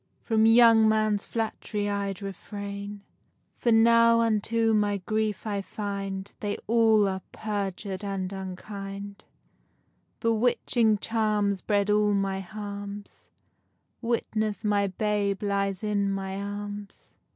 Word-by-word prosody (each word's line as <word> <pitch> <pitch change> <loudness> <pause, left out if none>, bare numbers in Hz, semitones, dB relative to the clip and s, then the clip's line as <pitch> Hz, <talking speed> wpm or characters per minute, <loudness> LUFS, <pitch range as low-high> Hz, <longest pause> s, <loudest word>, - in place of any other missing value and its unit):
From 220 -1 +3
young 225 -1 +7
men's 215 -1 +1
flatt'ry 220 -2 -3
I'd 200 -1 -2
refrain; 200 +1 -6 0.6
For 235 - +2
now 230 +1 +6
unto 225 0 +1
my 205 -1 +2
grief 215 +2 -2
I 205 -2 -1
find 195 -1 -5
They 205 -1 -2
all 220 -2 +4
are 190 0 -2
perjur'd 200 -2 -4
and 195 -1 -3
unkind; 195 +1 -7 0.9
Bewitching 230 -1 +2
charms 210 -3 0
bred 205 -1 +1
all 210 0 +3
my 195 -1 0
harms;— 205 0 -8 0.7
Witness 220 -3 -1
my 205 -1 +2
babe 205 +1 -1
lies 200 -1 -1
in 205 -2 0
my 195 -1 -3
arms. 205 0 -7
205 Hz, 110 wpm, -27 LUFS, 200-220 Hz, 0.9 s, young